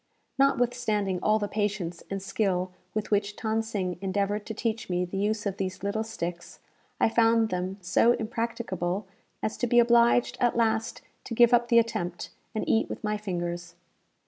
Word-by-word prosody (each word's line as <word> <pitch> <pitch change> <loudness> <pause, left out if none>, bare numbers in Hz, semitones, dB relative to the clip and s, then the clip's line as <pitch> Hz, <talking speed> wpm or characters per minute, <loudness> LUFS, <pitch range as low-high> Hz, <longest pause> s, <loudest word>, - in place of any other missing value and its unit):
Notwithstanding 240 -8 +1
all 215 0 +3
the 205 -1 -2
patience 205 -5 -2
and 195 -1 -4
skill 185 -3 0 0.2
with 215 0 -2
which 205 0 +1
Than 220 0 0
Sing 195 -6 -3
endeavoured 200 +2 -1
to 220 - -4
teach 225 -2 -2
me 180 0 0
the 180 - -8
use 210 +1 0
of 200 -1 -2
these 185 -1 -4
little 210 +2 -1
sticks, 175 -6 -6 0.4
I - - +4
found 225 0 +3
them 185 +1 -3
so 190 +6 +4
impracticable 220 -5 -2 0.4
as 215 - -2
to 245 - 0
be 240 - +2
obliged 235 0 +4
at 240 -1 +2
last 225 -1 0 0.2
to 230 - -5
give 240 +1 +6
up 240 0 +4
the 235 - +4
attempt, 180 -7 0 0.2
and 215 - -2
eat 225 - +2
with - - -6
my 210 0 0
fingers. 175 -4 -4
210 Hz, 170 wpm, -27 LUFS, 185-230 Hz, 0.4 s, give